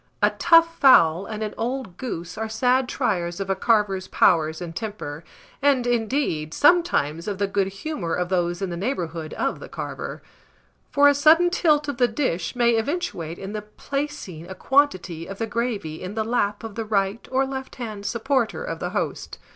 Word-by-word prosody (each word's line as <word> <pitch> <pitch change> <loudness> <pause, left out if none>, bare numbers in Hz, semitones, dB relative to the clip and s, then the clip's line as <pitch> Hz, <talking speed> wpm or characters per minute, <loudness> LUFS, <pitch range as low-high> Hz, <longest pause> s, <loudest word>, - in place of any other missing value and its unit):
A - - +5
tough 330 -1 +5
fowl 175 - +6
and 220 -1 -4
an 210 - -4
old 240 -6 -3
goose 175 -9 -5
are 220 0 -4
sad 250 +3 +2
triers 180 -10 -1
of 195 0 -2
a - - +1
carver's 200 -3 +1
powers 160 -3 +3
and 170 -2 -7
temper, 205 -9 -5 0.4
and, 275 -4 +3
indeed, 225 - -1
sometimes 285 - +3
of 205 -2 -2
the 200 - +1
good 195 -1 0
humour 195 - -4
of 180 0 -2
those 175 0 0
in 190 - -2
the 170 - -4
neighbourhood 170 - -3
of - - -1
the - - -10
carver; - - -6 0.7
for 285 0 +5
a 285 - +6
sudden 320 +5 +5
tilt 300 -4 +2
of 285 -4 -3
the 245 -1 +4
dish 240 - -2
may 235 -1 +3
eventuate 220 - -3
in 195 +2 -7
the 210 - -3
placing 210 - -5
a 190 - -7
quantity 185 - +1
of 195 - -7
the 225 - -1
gravy 220 -9 -3
in 185 +3 -6
the 220 - 0
lap 210 -3 0
of 225 -2 -6
the 225 - -3
right 205 0 -1
or 265 +1 +2
left 265 0 -6
hand 215 -5 -6
supporter 235 +2 -1
of - - -5
the - - -3
host. - - -3
215 Hz, 185 wpm, -24 LUFS, 180-265 Hz, 0.7 s, fowl